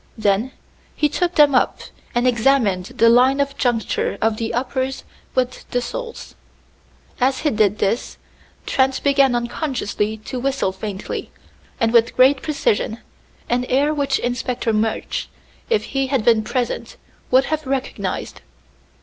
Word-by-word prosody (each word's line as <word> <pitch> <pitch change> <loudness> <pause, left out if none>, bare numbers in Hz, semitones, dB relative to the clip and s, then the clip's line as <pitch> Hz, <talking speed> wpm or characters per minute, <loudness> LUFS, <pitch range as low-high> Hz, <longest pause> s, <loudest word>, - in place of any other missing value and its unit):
Then 215 +3 +1 0.4
he 300 - +2
took 355 +4 -1
them 295 -2 +6
up 250 - +2 0.3
and 240 +1 +2
examined 235 -6 +2
the 230 - +2
line 255 +4 +5
of 280 0 0
juncture 240 -4 0
of 220 0 +1
the 225 0 -2
uppers 260 +2 -2 0.3
with 255 -1 -1
the 245 - 0
soles. 465 - -6 0.9
As 260 +1 +1
he 300 - +1
did 210 -1 +2
this, 215 +4 -1 0.5
Trent 265 0 +1
began 275 -3 +4
unconsciously 235 -4 -2
to 255 - -4
whistle 270 -6 0
faintly, 195 0 -5 0.5
and 230 0 +1
with 235 -1 +4
great 260 +1 +5
precision, 230 -7 0 0.5
an 245 +1 +1
air 280 +4 +2
which 280 -2 +1
Inspector 245 -1 -2
Murch, 220 +1 -1 0.4
if 450 -2 +2
he 270 -1 -1
had 260 -5 0
been 225 -2 +4
present, 245 +1 -3 0.3
would 260 +1 +4
have 310 -2 -3
recognized. 270 0 -3
250 Hz, 140 wpm, -20 LUFS, 225-275 Hz, 0.9 s, them